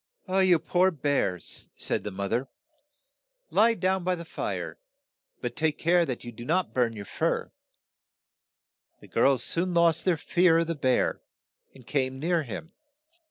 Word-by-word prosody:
"You 185 -1 +4
poor 175 +4 +2
bear," 145 - 0
said - - -3
the - - -3
moth 100 0 -4
er, 125 +3 0 1.0
"lie 230 +2 +4
down 190 -1 0
by 180 +1 +1
the 170 -1 -8
fire, - - -4 0.6
but - - -4
take 155 -1 0
care 170 0 +3
that 125 - -4
you 120 - -7
do 120 +1 -10
not 175 +8 0
burn 120 -3 +1
your 100 -2 -7
fur." - - -1 1.5
The - - -15
girls 135 -2 +3
soon 175 +1 0
lost 170 -1 +4
their 180 -3 +2
fear 175 +1 +3
of 165 - +2
the 165 - -2
bear, 130 -5 +1 0.5
and 130 -3 -15
came 130 -1 -1
near 165 +4 +1
him. 155 - -7
160 Hz, 160 wpm, -27 LUFS, 130-180 Hz, 1.5 s, You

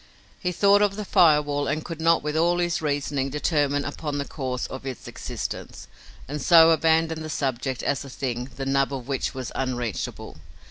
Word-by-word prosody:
He 180 - -1
thought 200 +3 +4
of 205 -1 +2
the 210 0 -5
fire 155 -5 +5
wall, 145 -1 -2
and 155 +2 -2
could 165 -2 -6
not 165 -1 +3
with 150 0 -2
all 170 +2 +3
his 175 -2 0
reasoning 145 -2 -1
determine 145 -1 0
upon 145 0 -4
the 140 - -2
cause 130 -4 -4
of 130 - -7
its 130 -2 -7
existence, - - -6 0.4
and 145 +2 -4
so 165 -1 +7
abandoned 160 0 +2
the 155 - -6
subject 130 -3 -2
as 140 -1 0
a 140 - -10
thing, 125 -1 -4
the 135 - -4
nub 135 0 +1
of 130 -3 -5
which 135 -2 -2
was 130 -3 -5
unreachable. 120 -5 -4
145 Hz, 190 wpm, -25 LUFS, 135-160 Hz, 0.4 s, so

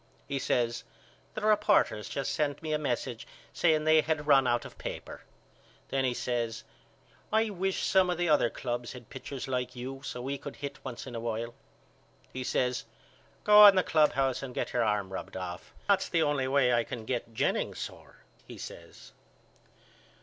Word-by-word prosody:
He 140 -1 -2
says 120 -2 0 0.5
The 215 - -3
reporters 210 - +3
just 135 +2 -2
sent 145 0 -1
me 155 -1 -2
a 150 - +1
message 125 -4 -3 0.3
saying 155 -3 +3
they 155 0 +5
had 155 -1 -1
run 135 -3 +5
out 120 -1 +1
of - - -12
paper. - - -6 0.7
Then 135 0 0
he 125 -1 0
says 120 -3 -2 0.7
I 220 0 +2
wish 190 0 -1
some 190 -1 +4
of 175 - 0
the 175 0 0
other 150 -6 +4
clubs 120 -1 -4
had 125 -3 -12
pitchers 135 0 -6
like 125 -1 -2
you 130 +2 -6
so 125 - -5
we 140 +1 -3
could - - -8
hit 140 -1 -7
once 125 -3 -6
in 130 - -8
a 115 - -3
while. 115 0 -3 0.8
He 130 - -4
says 125 -1 0 0.6
Go 210 0 +9
in 200 - +8
the 185 - +4
clubhouse 135 -4 +2
and 130 -2 -7
get - - -2
your 120 - +2
arm 105 -3 0
rubbed - - -6
off. 90 -1 -6 0.2
That's 200 -1 +3
the 165 -2 +2
only 145 -3 +1
way 130 -2 +3
I 120 0 +3
can 115 -1 -7
get 115 -2 -3
Jennings - - 0
sore - - -9 0.2
he - - -9
says. - - -11
135 Hz, 180 wpm, -30 LUFS, 120-155 Hz, 0.8 s, Go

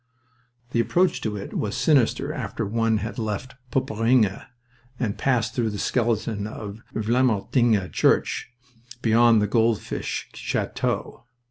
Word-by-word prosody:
The 120 - +1
approach 180 +10 +2
to 105 -1 -2
it 100 - -7
was 105 -1 -2
sinister 140 -7 +2
after - - -3
one 115 +1 +1
had 105 +3 -4
left 110 +3 -3 0.2
Poperinghe 115 -4 +1 0.5
and 110 -5 -1
passed 120 -4 0
through 115 -2 0
the 105 - -5
skeleton 110 -2 0
of 105 0 -8
Vlamertinghe 110 -2 +2
church, - - +2 0.5
beyond 115 -2 +5
Goldfish 115 -2 0
Chateau... - - -3
115 Hz, 115 wpm, -24 LUFS, 105-120 Hz, 0.5 s, beyond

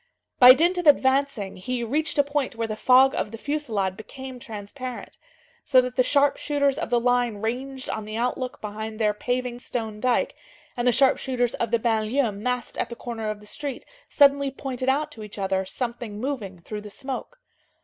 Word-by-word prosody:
By 250 0 +11
dint 345 +5 +2
of 350 - -1
advancing, 270 -7 +3
he 240 +6 -3
reached 300 +8 -1
a 285 - +6
point 285 -3 -2
where 230 0 -1
the 215 -1 -4
fog 260 +4 +5
of - - -2
the 225 - -8
fusillade 225 -10 -2
became 260 +4 -9
transparent. 240 +2 -7 0.4
So 260 - +5
that 250 0 -1
the 255 - +4
sharpshooters 285 +1 +2
of 335 - -3
the 240 - +3
line 245 -1 +2
ranged 260 +5 -4
on 220 -1 -3
the 215 +1 -5
outlook 250 +1 -2
behind 215 +1 -5
their 215 -2 +2
paving 245 +2 -2
stone 220 -4 -4
dike 250 +1 +1 0.4
and 240 0 -1
the - - +6
sharpshooters 255 -1 +2
of 235 - -2
the 235 - +3
banlieue 225 +2 +1
massed 245 +4 -3
at - - -1
the 235 - -6
corner 225 -3 -5
of 210 -1 -5
the - - -14
street 275 +4 -5 0.2
suddenly 280 -1 +4
pointed 260 -1 -3
out 300 +3 +1
to 220 -7 -9
each 210 0 -10
other 190 -1 0
something 235 -2 -4
moving 225 -8 -4
through 210 +5 -7
the 210 - -9
smoke. 270 - -6
245 Hz, 190 wpm, -25 LUFS, 220-270 Hz, 0.4 s, By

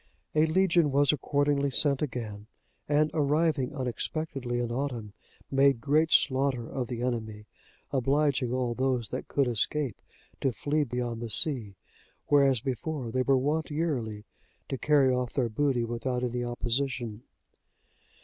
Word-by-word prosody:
A 155 +1 +4
legion 170 -2 +3
was 140 +1 +4
accordingly 145 0 +1
sent 140 0 +2
again, 110 -7 -4 0.4
and, 150 +1 +3
arriving 150 -2 +1
unexpectedly 130 0 -3
in 120 -1 -2
autumn, 120 -5 -3 0.4
made 135 -2 +4
great 155 +6 +2
slaughter 130 -3 +2
of 130 -3 -3
the 120 -1 -4
enemy, 110 -4 -3 0.5
obliging 140 -1 +1
all 125 -2 0
those 125 -2 -1
that - - -5
could 140 -2 +1
escape, 125 +2 -1 0.4
to 135 - +1
flee 150 +5 0
beyond 120 -3 -3
the 120 - -4
sea; 110 -4 +1 0.5
whereas 135 -4 +4
before, 130 0 -3
they 130 - +1
were 135 +1 +3
wont 150 +5 0
yearly 125 -10 -2 0.4
to - - -1
carry 140 -4 +4
off 125 -1 -2
their 125 -4 0
booty 130 +1 +1
without 125 +2 -2
any 125 0 -1
opposition. 120 -1 -2
130 Hz, 140 wpm, -28 LUFS, 120-145 Hz, 0.5 s, A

